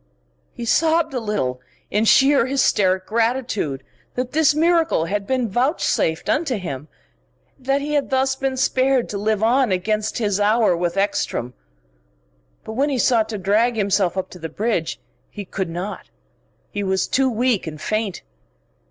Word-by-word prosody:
He 235 - -7
sobbed 320 +4 +2
a 255 - -1
little 195 - -2 0.3
in 210 +2 +2
sheer 270 +2 +5
hysteric 190 -8 +2
gratitude, 225 - -1 0.3
that 250 0 -3
this 310 -1 +3
miracle 330 - +2
had 200 +2 -3
been 255 -2 0
vouchsafed 240 - 0
unto 285 -6 0
him, 150 -7 -6 0.7
that 270 +2 0
he 295 +1 -3
had 290 -2 0
thus 265 0 +1
been 265 -1 -2
spared 260 -1 +2
to 200 - -4
live 215 0 0
on 245 0 +3
against 215 +3 -1
his 210 -4 0
hour 210 -2 +3
with 175 +1 -2
Ekstrom. 160 - -1 1.1
But 220 - -7
when 275 +6 +1
he 275 - -1
sought 230 -2 +2
to 215 - -3
drag 215 +5 +2
himself 195 -3 +1
up 190 - -3
to 180 - -11
the 165 0 -5
bridge, 200 -2 -2 0.3
he 205 - -8
could 190 -1 -4
not, 180 +5 -6 0.6
he 205 - -3
was 190 -1 0
too 265 0 +2
weak 240 -5 0
and 155 -1 -6
faint. 215 +1 -2
220 Hz, 160 wpm, -21 LUFS, 190-265 Hz, 1.1 s, sheer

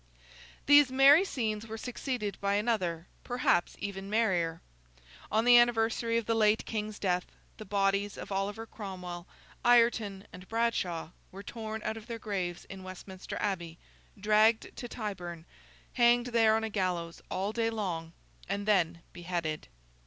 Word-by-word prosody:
These 290 -2 +7
merry 275 +6 +7
scenes 225 - -3
were 225 0 -6
succeeded 245 -3 -4
by 200 0 +1
another, 190 -7 0 0.2
perhaps 245 -8 +1
even 195 -1 -5
merrier. 180 -7 +1 0.7
On 220 +2 +2
the 245 0 +9
anniversary 230 -1 +2
of 230 - -1
the 230 - +1
late 215 -1 +3
King's 215 -1 -4
death, 180 -2 0 0.3
the 215 - -9
bodies 200 0 0
of - - -8
Oliver 200 +3 -2
Cromwell, 180 -5 -7 0.4
Ireton, 230 -5 +3
and 180 +1 -11
Bradshaw, 190 -8 -1 0.2
were 195 +2 -9
torn 220 0 -6
out 220 +1 -2
of 220 0 -11
their 230 -2 -4
graves 190 -6 -4
in 195 -1 -9
Westminster 185 0 -8
Abbey, 175 -5 -3 0.4
dragged 215 +2 +3
to 245 - -6
Tyburn, 180 -8 -6 0.5
hanged 240 0 +4
there 225 -2 +5
on 220 - 0
a 225 - -2
gallows 180 -4 -2
all 195 +3 -1
day 230 0 +1
long, 180 -7 -3 0.4
and 200 +1 -2
then 175 -5 +2
beheaded. 170 -3 -3
210 Hz, 145 wpm, -30 LUFS, 185-225 Hz, 0.7 s, the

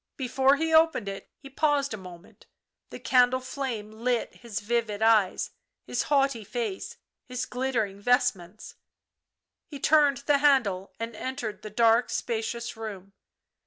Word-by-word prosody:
Before 265 +1 +3
he 320 +2 -1
opened 320 -9 +4
it 195 0 -7
he 275 - -12
paused 280 -1 0
a - - -2
moment; 180 -2 -13 0.4
the - - -9
candle 250 0 +3
flame 255 -5 -5
lit 235 +2 -1
his 235 -4 -5
vivid 220 -1 -1
eyes, 215 -4 +3 0.3
his - - -1
haughty 275 -5 +2
face, 215 -2 -4 0.3
his 250 0 -3
glittering 245 -6 -2
vestments 215 -5 0 0.9
He 285 - -9
turned 290 -1 +4
the 290 -1 +3
handle 230 -10 +2
and 230 0 -5
entered 245 -2 -5
the 215 - -7
dark, 230 +3 +3
spacious 235 0 -3
room. 200 -3 -8
235 Hz, 135 wpm, -27 LUFS, 215-270 Hz, 0.9 s, opened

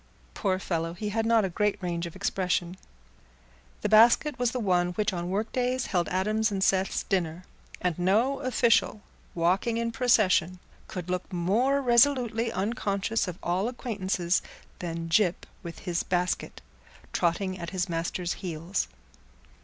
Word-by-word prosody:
Poor 190 -2 0
fellow, 165 -3 -2
he 210 +4 -4
had 225 +2 -1
not 230 -3 +4
a - - +1
great 210 +3 0
range 175 -2 -3
of 170 - -11
expression. 185 -2 -1 1.1
The 210 - -1
basket 235 +5 +5
was 245 -1 +2
the 250 - -3
one 180 -4 +1
which 210 +2 0
on 175 0 -3
workdays 245 +6 -1
held 175 -3 0
Adam's 215 +4 +1
and 195 -1 -1
Seth's 190 0 +1
dinner; 175 -2 -1 0.4
and 180 -2 -1
no 225 +10 +2
official, 240 -5 +2 0.3
walking 185 +7 +1
in 230 0 -1
procession, 205 -7 +3 0.3
could 180 -2 -6
look 180 +2 -3
more 225 +11 +1
resolutely 240 -2 +3
unconscious 205 0 -1
of 180 -1 -5
all 180 +5 0
acquaintances 195 -8 -1 0.4
than 165 -2 -4
Gyp 175 +1 +2 0.2
with 170 -2 -8
his 175 -2 0
basket, 180 0 -2 0.5
trotting 185 +2 0
at 170 -1 -5
his 185 -1 -2
master's 170 +1 -2
heels. 175 +1 -2
190 Hz, 145 wpm, -27 LUFS, 175-225 Hz, 1.1 s, basket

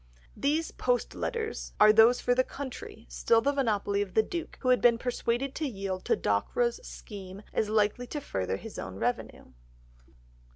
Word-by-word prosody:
These 300 +8 0
"post - - 0
letters" 455 -2 -4
are 215 0 +8
those 225 +3 +6
for 245 - +2
the 255 +1 +3
country, 255 -4 -8
still 230 - +2
the 280 +5 +1
monopoly 205 -7 0
of 195 -3 -5
the 220 - +5
Duke, 335 +7 -5
who 255 - 0
had 250 - +4
been 235 -1 +5
persuaded 245 +2 -1
to 310 - -2
yield 195 -5 -4
to 460 - +3
Dockwra's 480 +2 0
scheme 200 - -9
as 215 - 0
likely 215 +3 +1
to 295 - -4
further 95 - -3
his - - -9
own - - -6
revenue. - - -3
240 Hz, 170 wpm, -29 LUFS, 210-280 Hz, -, are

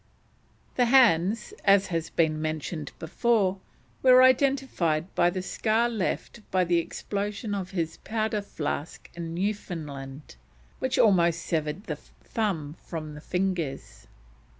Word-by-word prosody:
The 250 - +4
hands, 225 -5 +4
as 200 -1 +5
has 165 -1 -1
been 155 -2 +1
mentioned 155 0 -3
before, 195 +2 +1 0.4
were 255 -1 +7
identified 260 - +2
by 175 - +4
the 185 +1 -4
scar 220 +4 +1
left 225 +1 -3
by 185 -1 +2
the 175 -1 +2
explosion 205 +4 -4
of 190 -2 -3
his 170 -4 -3
powder 215 -1 -2
flask 155 -5 -5
in 170 -1 -6
Newfoundland, 155 - -5 0.4
which 260 0 -1
almost 170 -5 +4
severed 155 +3 -2
the - - -4
thumb 175 -9 -4
from 155 -3 -6
the 150 - -10
fingers. 180 -6 -3
180 Hz, 125 wpm, -27 LUFS, 160-215 Hz, 0.4 s, were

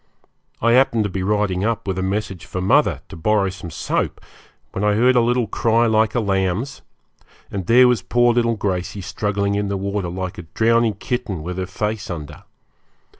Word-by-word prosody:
I 115 - +4
happened 120 -3 +4
to 100 - -3
be 95 - -3
riding 100 -1 0
up 115 -1 -1
with 95 -1 -1
a - - -1
message 95 -1 -3
for 95 - -4
mother, 95 - +2
to - - -9
borrow 100 +4 +1
some 90 -2 -8
soap, 80 - -2 0.5
when 95 - -3
I 105 0 +3
heard 125 +4 +4
a 120 - +5
little 120 +1 +1
cry 115 +2 +2
like 110 0 +2
a - - +3
lamb's, 100 +5 -1 0.7
and 95 -3 -4
there 125 +2 +7
was 125 -5 +2
poor 120 +4 +3
little 115 -1 +2
Gracey 95 0 -2
struggling 100 +1 -1
in 100 0 -1
the 100 0 -2
water 100 -1 -2
like 90 0 -5
a 85 - -10
drowning 115 -1 +3
kitten, 105 -6 -3
with 90 +2 -5
her 95 - -3
face 105 +2 -3
under. 80 -5 -7
105 Hz, 190 wpm, -21 LUFS, 95-115 Hz, 0.7 s, there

